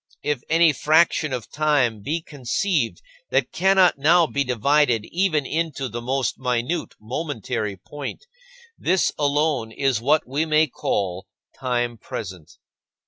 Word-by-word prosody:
If 145 -4 -1
any 165 -1 +5
fraction 155 +1 +3
of 120 -3 -5
time 140 -8 +1
be 160 +9 -2
conceived 145 - -1 0.3
that - - +1
cannot 190 -4 +3
now 165 +4 +5
be 140 -2 -1
divided 125 -2 +2
even 170 -5 +1
into 155 -3 -2
the 120 -1 -6
most 130 +1 -1
minute 125 +6 -2
momentary 115 - -4
point, 145 - -8 0.5
this 185 0 +1
alone 145 -5 +1
is 130 -2 0
what 150 +4 +2
we 140 +5 0
may 155 0 +3
call 95 - -3 0.3
time 120 -3 -2
present. 90 -5 -8
140 Hz, 130 wpm, -23 LUFS, 120-155 Hz, 0.5 s, any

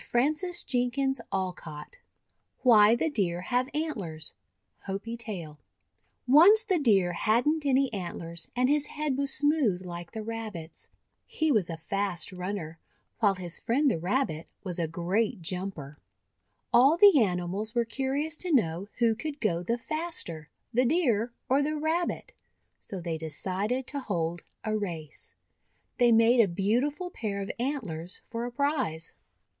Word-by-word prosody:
190 275 -2 0
THE 270 +1 0 0.2
WONDER 190 -1 -1
GARDEN 150 -2 -9 0.7
WHY 220 -3 +7
THE 315 +6 0
DEER 180 -8 0
HAVE 250 +7 0
ANTLERS 200 - -3 0.5
Hopi 200 +4 -4
Tale 180 -10 -6
• - - -44 0.7
ONCE 400 +9 +8
the 380 -6 +1
Deer 195 -10 +3
had 225 +9 +2
n't 305 -1 +1
any 270 -2 +2
antlers 170 -3 -5
and 250 +1 +3
his 295 +1 +2
head 300 -3 -2
was 280 0 0
smooth 270 - +2
like 175 -1 -7
the 220 - -4
Rabbit's. 215 -7 -6 0.4
He 315 -1 0
was 210 -9 +2
a 165 - -4
fast 195 +2 -1
runner, 180 -3 -5 0.4
while 205 -4 +3
his 180 -2 -3
friend 275 +4 +2
the 165 - -1
Rabbit 175 - -1 0.2
was 180 -3 -2
a 165 - 0
great 180 +4 -1
jumper. 165 -5 -4 0.7
All 275 +7 +6
the 385 -7 +8
animals 190 +3 -1
were 235 -1 +2
curious 275 +6 -2
to 360 - -1
know 185 - +1
who 235 -2 +3
could 285 +6 -5
go 175 -8 0
the 230 +7 -1
faster, 245 - -4 0.2
the 250 +2 +4
Deer 245 - +2 0.2
or 270 +2 +3
the 305 +2 0
Rabbit, 320 +3 -1 0.5
so 195 - -5
they 165 -2 -3
decided 190 - -2
to 280 +2 -4
hold 175 -8 -2 0.2
a 215 -1 -1
race. 170 -8 -5 0.6
They 240 -1 +5
made 230 +2 +5
a 225 - +6
beau 205 +10 +1
tiful 355 +5 -7
pair 205 - -3
of 195 - -4
antlers 200 - -4
for 230 +1 -4
a 245 - -5
prize. 260 - -1
225 Hz, 155 wpm, -28 LUFS, 180-275 Hz, 0.7 s, ONCE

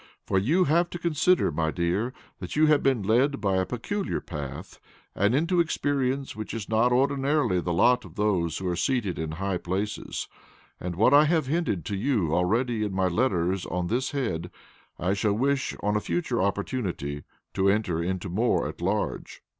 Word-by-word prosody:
For 95 - +2
you 155 - +3
have 170 +2 +2
to - - -5
consider, 170 - +2
my 80 +1 0
dear, 90 +9 -1 0.3
that - - -6
you 155 +1 +5
have 150 -1 +4
been 130 -6 +1
led 130 +7 +2
by 100 -3 +1
a 95 - 0
peculiar 195 - -3
path, 75 -5 -7 0.3
and 100 +5 +2
into 170 +5 +2
experience 140 -4 0
which 110 +1 -6
is 110 -3 -5
not 115 +3 +2
ordinarily 135 -4 +2
the 85 - -2
lot 120 +9 +3
of 90 -2 -13
those 90 -6 0
who 95 - -4
are 90 - 0
seated 115 -3 -1
in 80 -1 -3
high 95 +2 -2
places, 95 +4 -3 0.5
and 90 -1 -4
what 110 +9 +4
I 145 +1 +7
have 160 -1 +2
hinted 135 - -1
to 100 - -3
you 100 - 0
already 110 +6 +1
in 105 -2 -2
my 95 -1 +1
letters 95 -3 0
on 90 0 -2
this 125 +3 0
head, 90 - -2 0.5
I 90 +2 0
shall 100 +1 +1
wish 135 +5 0
on 105 +1 0
a - - +3
future 130 - -1
opportunity 95 - -2 0.3
to 95 0 +2
enter 100 -5 +1
into 95 +2 -2
more 110 +7 +1
at - - -8
large." - - -2
105 Hz, 185 wpm, -26 LUFS, 90-135 Hz, 0.5 s, I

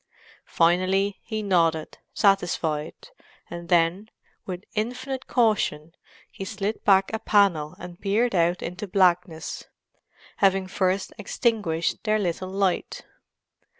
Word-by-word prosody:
Finally 185 +4 +2
he 220 -2 -4
nodded, 165 -5 +1
satisfied, 175 - 0 0.4
and 170 0 -7
then, 175 +5 +2 0.4
with 180 0 -5
infinite 250 +4 -3
caution, 200 - +1 0.4
he - - -7
slid 205 +2 -4
back 195 -1 +4
a 220 - -1
panel 185 -10 +2
and 175 0 -10
peered 215 +4 +1
out 175 0 +1
into 185 +5 -5
blackness—having 185 +1 -1
first 185 0 -1
extinguished 205 -6 -1
their 215 -1 +2
little 185 -2 -2
light. 195 -1 -1
190 Hz, 105 wpm, -25 LUFS, 170-205 Hz, 0.4 s, back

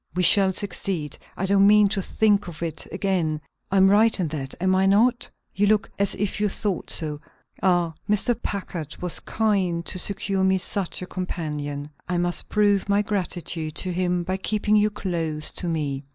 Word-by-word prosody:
"We 180 - +1
shall 195 +1 +7
succeed; 185 -6 -2 0.2
I 190 - -1
don't 200 0 +4
mean 210 0 +6
to 195 - -1
think 205 0 +1
of 170 -1 -7
it 160 -2 -5
again. 185 -6 -1 0.3
I'm 195 0 +4
right 215 +1 +4
in 170 -4 -1
that, 140 -3 -5
am 185 +1 +2
I 190 +1 +3
not? 235 +5 +2 0.2
You 205 +1 +1
look 210 0 +1
as 200 -1 +1
if 205 +1 -2
you 210 - +2
thought 195 -2 -3
so. 150 -2 +1 0.4
Ah, 175 -3 +2 0.2
Mr. 210 +3 +2
Packard 175 -6 -5
was 180 -1 0
kind 190 -6 -1
to 185 - -1
secure 195 0 0
me 190 0 +3
such 185 0 -1
a - - -4
companion. 150 -6 -5 0.2
I 180 - 0
must 175 0 +1
prove 205 -2 +2
my 200 +1 +3
gratitude 175 -6 -3
to 185 +1 -2
him 180 0 0
by 185 +2 -2
keeping 210 +2 0
you 210 0 +4
close 165 -7 -2
to 175 - -5
me. 145 -4 -2
185 Hz, 180 wpm, -24 LUFS, 170-200 Hz, 0.4 s, shall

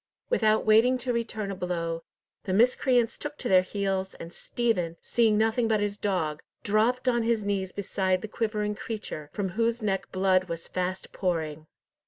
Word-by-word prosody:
Without 220 - +3
waiting 225 +4 +5
to 250 0 -2
return 220 -3 -2
a - - -4
blow, 170 -2 -2 0.4
the 185 - -1
miscreants 245 +2 +3
took 295 0 -5
to 250 - -3
their 185 -3 +6
heels, 190 0 -2
and 170 +1 -9
Stephen, 180 -9 -1
seeing 225 -3 +2
nothing 225 +2 +2
but 220 -1 +2
his 205 0 -1
dog, 180 -8 -1 0.2
dropped 230 +5 +2
on 240 -1 +3
his 225 -2 +1
knees 195 -2 -1
beside 190 -2 -1
the - - -3
quivering 210 -1 -1
creature, 205 -9 -6
from 200 -2 -2
whose 230 +5 0
neck 195 -2 -1
blood 185 -1 +3
was 170 -2 -5
fast 185 +1 -3
pouring. 160 -4 -2
205 Hz, 170 wpm, -27 LUFS, 185-230 Hz, 0.4 s, their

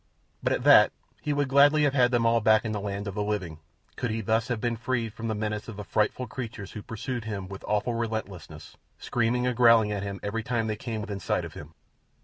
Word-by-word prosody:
But - - 0
at - - -2
that - - +7 0.3
he 150 - -2
would 145 -1 +1
gladly 145 +3 +5
have 145 -2 +2
had 125 -3 +4
them 120 -2 +1
all 115 0 +3
back 110 +1 +4
in 110 - -2
the 105 - -2
land 100 0 -4
of 100 - -4
the 105 - -2
living 95 -7 -3 0.4
could 120 - -2
he 110 +1 -2
thus 110 +2 +1
have 120 -3 -2
been 120 +1 -1
freed 115 -1 -2
from 115 0 -5
the 110 - -1
menace 105 0 -3
of 115 -3 -8
the 105 - -5
frightful 105 +5 0
creatures 110 -4 -7
who 105 - -7
pursued 115 +2 -5
him 100 -4 -4
with 95 0 -9
awful 105 +3 0
relentlessness, 105 -9 -5 0.2
screaming 120 +1 0
and 125 -1 0
growling 115 -3 +5
at 100 -1 -2
him 100 -1 -5
every 105 +3 -2
time 115 0 -1
they 110 -1 -1
came 110 0 -5
within 105 -2 -5
sight 90 - -1
of - - -9
him. 75 +2 -11
110 Hz, 240 wpm, -27 LUFS, 105-120 Hz, 0.4 s, that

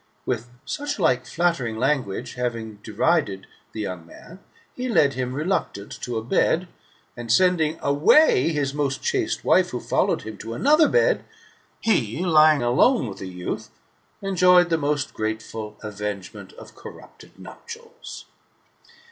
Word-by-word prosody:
With 120 -1 -3 0.2
such 290 0 -4
like 130 - +1
flattering 160 -8 -1
language 130 -5 -1
having 115 -3 -4
derided 105 - 0 0.3
the 110 - -6
young 90 -4 -5
man, 175 - -14 0.4
he 250 0 -4
led 155 - +3
him 125 -1 -3
reluctant 150 - -2
to 120 -2 -3
a 110 - -3
bed, 165 +8 +1 0.5
and 120 -1 -5
sending 165 +1 +3
away 145 - +4
his 145 -4 -1
most 140 -2 -2
chaste - - -1
wife - - +4
who - - -4
followed - - 0
him, 110 0 -8
to 115 0 -6
another 305 +3 +4
bed, - - +2 0.6
he, 170 - 0
lying 155 -4 +5
alone 125 - +3
with 100 - -9
the 95 - -6
youth, 90 -1 -5 0.5
enjoyed 180 -2 +4
the 165 - +3
most 145 -1 -1
grateful 110 -1 -5
avengement 100 -2 -6
of - - -13
corrupted - - -14
nuptials. - - -11
135 Hz, 140 wpm, -23 LUFS, 110-170 Hz, 0.6 s, lying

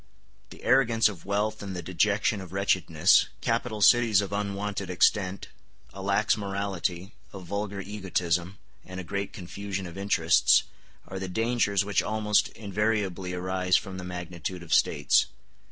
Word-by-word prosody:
The - - -14
arrogance 120 -3 +4
of 90 -6 -10
wealth 105 +2 -1
and 100 -2 -6
the 90 - -5
dejection 100 +4 +1
of 90 -2 -10
wretchedness, 95 -3 +3
capital 115 -2 -1
cities 115 -4 +5
of 100 -1 -3
unwonted 100 -1 -3
extent, 95 +1 +1 0.4
a 95 - -8
lax 100 +2 +2
morality, 95 -2 -3 0.2
a 100 - -8
vulgar 100 +2 -4
egotism, 95 -2 -2 0.3
and 95 0 -8
a - - -5
great 100 +2 -4
confusion 95 +1 -6
of 85 +2 -8
interests, 100 +1 +4 0.4
are 95 - -6
the 95 - -4
dangers 105 -1 +1
which 100 -1 +1
almost 105 0 +1
invariably 100 -3 -2
arise 90 0 +1
from 95 -1 -6
the - - -7
magnitude 90 0 -6
of 85 - -3
States. 75 - +3
100 Hz, 145 wpm, -27 LUFS, 90-105 Hz, 0.4 s, cities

